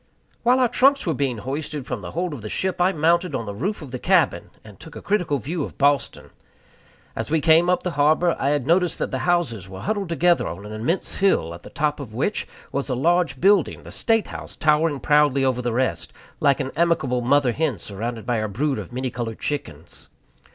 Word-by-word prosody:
While 250 +2 +4
our 255 - +4
trunks 275 +4 +3
were 165 - +1
being 135 -5 -1
hoisted 140 +4 -5
from - - -4
the - - -8
hold 175 0 -2
of 135 - -7
the 105 - -6
ship, 185 - -2
I 180 +2 +4
mounted 170 -1 +1
on 115 - -3
the 100 - -5
roof 185 - -3
of 135 - -10
the 125 - -5
cabin, - - +2
and 105 -2 -14
took 160 - -12
a - - -6
critical 180 -8 0
view 155 +4 -3
of - - -8
Boston. 140 0 +1 0.8
As - - -4
we 160 +1 +2
came 165 +3 +4
up 180 - +1
the 180 - -2
harbor, 155 +4 +3
I 140 - +1
had 145 -3 0
noticed 170 +2 +2
that - - -3
the - - -2
houses 120 - 0
were 95 -1 -8
huddled 205 -3 -2
together 175 +1 +2
on 90 +5 -7
an 105 - -8
immense 120 - -2
bill, 135 - +2
at 85 - -10
the - - -12
top 150 0 -1
of 115 -6 -8
which 175 - -1 0.2
was 140 0 -2
a 130 - 0
large 165 0 +1
building, 195 +1 +3
the - - -11
State 225 -2 +1
House, - - -8
towering 150 -1 +2
proudly 145 -1 +3
above 130 -2 +1
the 120 - -1
rest, 130 +3 -1 0.3
like 140 -3 +3
an 130 - -3
amiable 160 -7 +1
mother 130 +1 +3
hen 145 -3 -1
surrounded 110 +5 -5
by 120 -2 0
her 110 - -1
brood 135 +7 -1
of - - -8
many 130 +1 -3
colored 115 -3 -4
chickens. 85 - -5
145 Hz, 220 wpm, -23 LUFS, 125-170 Hz, 0.8 s, While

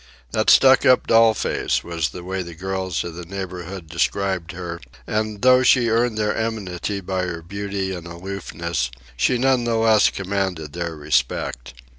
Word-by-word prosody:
"That 110 - +1
stuck 135 0 +7
up 130 - +5
doll 115 -1 +5
face," - - -1
was 85 -4 -2
the 90 - -9
way 95 +1 -3
the 85 -2 -8
girls 95 -1 -3
of 85 - -6
the 90 +2 -7
neighbourhood 90 -1 -7
described 90 +1 -1
her; 85 -2 -6 0.2
and 110 0 -2
though 130 0 +6
she 120 -2 +4
earned 115 0 +1
their 105 -1 0
enmity 105 -3 -3
by 95 0 -2
her 85 -2 -5
beauty 100 +1 -4
and 85 -2 -7
aloofness, 85 -5 -4 0.3
she 125 - +2
none 130 0 +2
the 115 -1 +1
less 110 -1 +4
commanded 95 -6 -3
their 85 -1 -4
respect. 65 -4 -1
95 Hz, 165 wpm, -22 LUFS, 85-110 Hz, 0.3 s, stuck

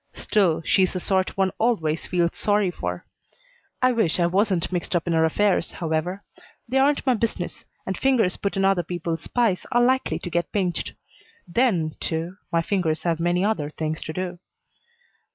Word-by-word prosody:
Still, 180 -6 +1
she 190 - +3
is 185 - +2
the 185 - -2
sort 190 +1 0
one 190 -1 +2
always 165 -10 0
feels 175 -2 +1
sorry 205 -3 +1
for. 90 - -5 0.8
I 255 - +5
wish 220 -9 +1
I 170 - +4
wasn't 190 0 +1
mixed 180 0 -2
up 170 - +1
in 170 - 0
her 160 0 +4
affairs, 190 +2 +1
however. 170 +4 -2 0.4
They 260 +3 +1
aren't 280 +2 +2
my 260 - +4
business 220 -6 -3 0.2
and 190 - -2
fingers 240 -8 +2
put 200 0 -3
in 195 - +2
other 195 -2 +3
people's 170 -1 -4
pies 230 -7 +1
are 240 0 +4
likely 255 -10 +1
to 175 - -6
get 170 0 -1
pinched. 185 -4 -1 0.5
Then, 175 -5 +1
too, 165 +3 -3
my 165 0 +2
fingers 165 -5 0
have 165 -2 0
many 175 +2 +1
other 180 -9 0
things 155 0 -4
to - - -5
do. 180 +1 -4
180 Hz, 180 wpm, -24 LUFS, 165-205 Hz, 0.8 s, I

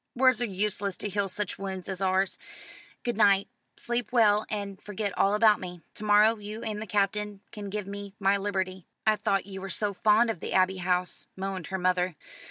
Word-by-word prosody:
Words 255 -2 +4
are - - +2
useless 200 -1 -2
to 205 - -3
heal 200 0 -1
such 205 +2 -3
wounds 190 -2 -5
as 190 -1 -5
ours. 190 0 +1 0.6
Good 240 -3 -2
night. 200 -2 +5 0.3
Sleep 240 0 -2
well, 215 -3 +4
and 200 -2 -4
forget 205 -2 -4
all 200 +1 +3
about 215 -1 +5
me. 180 -2 -8
To - - -9
morrow 210 +2 +5
you 210 +2 -7
and 215 -1 -3
the 220 - -5
Captain 205 +1 0
can 205 -1 -7
give 205 0 -3
me 200 0 -7
my 195 0 +3
liberty." 190 -2 -2 0.2
"I 215 0 +5
thought 195 -2 0
you 190 -1 -7
were 195 - -5
so 205 +2 -1
fond 220 +4 +4
of 180 - -7
the - - -4
Abbey 190 0 +3
House," 180 0 -1
moaned 190 -3 -4
her 190 - -2
mother. 180 -1 +1
200 Hz, 200 wpm, -28 LUFS, 190-210 Hz, 0.6 s, night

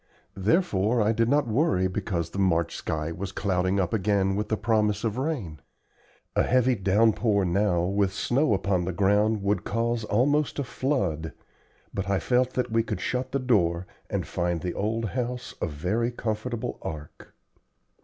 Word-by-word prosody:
Therefore 110 - +2
I 105 0 +3
did 115 +1 +1
not 145 0 +2
worry 105 - +2
because 90 -4 -3
the 100 - -4
fickle 95 - +4
March 85 -2 0
sky 75 +1 -3
was 95 +3 -5
clouding 95 0 0
up 95 +1 0
again 100 -2 +1
with 105 +1 -2
the 110 - +1
promise 105 -2 +1
of 115 +1 -1
rain. 125 - -3 0.8
A - - +4
heavy 130 0 +3
downpour 105 0 +2
now 90 -1 +1
with 100 +1 +1
snow 120 +4 +1
upon 95 -2 0
the 95 - -2
ground 105 +3 +2
would 100 +1 +1
cause 115 +1 -1
almost 145 +8 +1
a 140 - 0
flood, 95 - -1 0.6
but 95 -1 -3
I 100 - +2
felt 125 +8 +1
that 125 -2 -1
we 115 0 +3
could 115 - -4
shut 130 +1 -2
the 140 - +1
door 95 -10 +1 0.2
and - - -2
find 85 -2 -1
the 90 - -3
old 110 +1 -1
house 125 +1 -3
a - - +1
very 90 +11 -1
comfortable 120 0 -3
ark. 75 -2 -8
105 Hz, 170 wpm, -26 LUFS, 95-120 Hz, 0.8 s, fickle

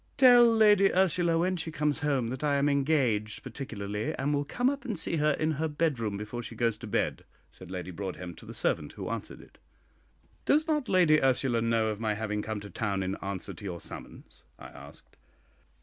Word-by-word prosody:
"Tell 245 -2 +8
Lady 210 -3 +5
Ursula 175 -2 +2
when 180 +2 +1
she 160 -1 -4
comes 150 -1 0
home 140 -6 0
that 130 +3 -5
I 145 -1 +2
am 140 +1 +2
engaged 135 -7 +1
particularly, 110 -1 -4
and 140 +2 -1
will 145 0 +1
come 245 - -1
up 280 +1 -1
and 225 -8 -3
see 165 - -1
her 150 0 +3
in 155 +2 0
her 160 - +1
bedroom 140 -10 -1
before 110 +4 -5
she 115 0 -9
goes 115 -1 +1
to 115 - -8
bed," 105 - -1 0.3
said 95 - -13
Lady 90 0 -5
Broadhem 90 -1 -6
to - - -13
the - - -8
servant - - -1
who - - -6
answered - - -6
it. - - -19 0.8
"Does 310 +3 +2
not 300 -4 0
Lady 165 -5 +4
Ursula 130 -3 +2
know 115 -1 +1
of 105 -1 -4
my 110 -2 -1
having 105 -1 -2
come 110 0 -4
to 100 - -9
town 100 -1 -2
in 95 +1 -2
answer 100 -2 -5
to 110 - -13
your 90 -4 -5
summons?" - - -10 0.2
I - - -11
asked. 70 +2 -15
135 Hz, 205 wpm, -29 LUFS, 105-160 Hz, 0.8 s, Tell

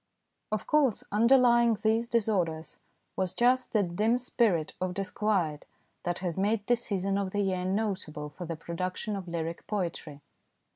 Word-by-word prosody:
Of 215 -2 -1
course, 285 -8 +2
underlying 235 +1 +5
these 225 +2 +2
disorders 180 -9 0 0.4
was 185 -2 -1
just 250 +1 +3
that 190 -6 +1
dim 225 +5 +3
spirit 220 -10 +1
of 185 -1 -1
disquiet 195 -6 -1 0.3
that 175 -1 -2
has 175 +1 -2
made 205 +1 +1
this 240 +1 +1
season 195 -1 0
of 195 -1 -1
the 205 +2 -1
year 185 -2 -1
notable 185 -7 -2
for 175 +4 -8
the 165 0 -4
production 180 +5 -4
of 190 -2 -6
lyric 170 -1 -4
poetry. 170 -7 -4
195 Hz, 150 wpm, -29 LUFS, 175-225 Hz, 0.4 s, underlying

